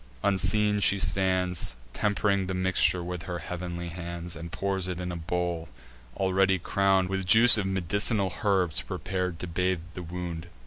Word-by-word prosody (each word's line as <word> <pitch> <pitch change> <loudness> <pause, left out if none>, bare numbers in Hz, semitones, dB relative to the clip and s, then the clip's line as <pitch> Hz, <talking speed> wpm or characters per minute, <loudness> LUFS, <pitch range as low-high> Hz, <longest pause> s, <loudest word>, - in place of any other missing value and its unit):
Unseen 105 +1 +3
she 100 0 +3
stands, 95 -6 0 0.2
Temp'ring 100 -2 0
the 95 - -3
mixture 95 -1 +2
with 90 -1 -5
her 90 - -3
heav'nly 85 -1 -6
hands, 85 0 -6
And 85 +1 -8
pours 95 -2 -2
it 90 -1 -4
in 90 0 -4
a - - -5
bowl, 85 -1 -3 0.5
already 95 0 +2
crown'd 95 +1 +1
With 95 0 -2
juice 115 +5 +9
of 105 -3 0
med'c'nal 95 +1 +1
herbs 95 -6 +1
prepar'd 90 -2 -4
to - - -4
bathe 90 0 -1
the 90 - -7
wound. 85 -1 -6
90 Hz, 160 wpm, -27 LUFS, 85-95 Hz, 0.5 s, juice